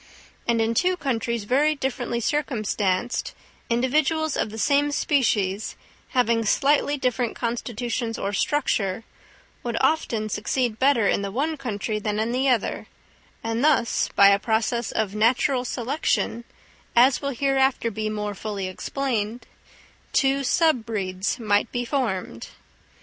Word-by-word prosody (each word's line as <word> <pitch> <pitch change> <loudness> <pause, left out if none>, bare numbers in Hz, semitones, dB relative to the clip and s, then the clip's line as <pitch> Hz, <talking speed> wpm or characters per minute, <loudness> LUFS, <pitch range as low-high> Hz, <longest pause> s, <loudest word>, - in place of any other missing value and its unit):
And 235 -1 +2
in 225 +1 +1
two 365 +9 +2
countries 235 -5 -2
very 285 +8 +2
differently 245 -3 -2
circumstanced, 230 -5 -1 0.3
individuals 300 +6 +1
of - - -1
the 220 - -8
same 290 +4 +2
species, 215 -9 0 0.4
having 230 -2 +3
slightly 290 +5 +2
different 250 -3 -1
constitutions 235 0 -3
or 200 - -3
structure, 215 -6 0 0.6
would 235 -1 -3
often 230 -9 +1
succeed 220 +2 -1
better 260 -6 +4
in - - +1
the 200 - -3
one 290 +10 -1
country 220 -5 -3
than 210 0 -2
in 220 +2 0
the 260 +2 +1
other, 240 -5 0 0.6
and 225 +2 -1
thus 290 -6 +2
by 200 0 +8
a 200 0 +4
process 225 +1 0
of 210 -3 -1
"natural 245 +4 +2
selection," 245 -1 -1 0.5
as 250 +2 +5
will 280 - -2
hereafter 270 -2 +1
be 215 +1 -3
more 210 -1 -3
fully 200 -1 -4
explained, 230 +2 -3 0.7
two 275 0 +2
sub 310 -3 +2
breeds 195 -1 -2
might 210 -1 +1
be 245 0 -2
formed. 205 - -2
235 Hz, 135 wpm, -24 LUFS, 215-270 Hz, 0.7 s, by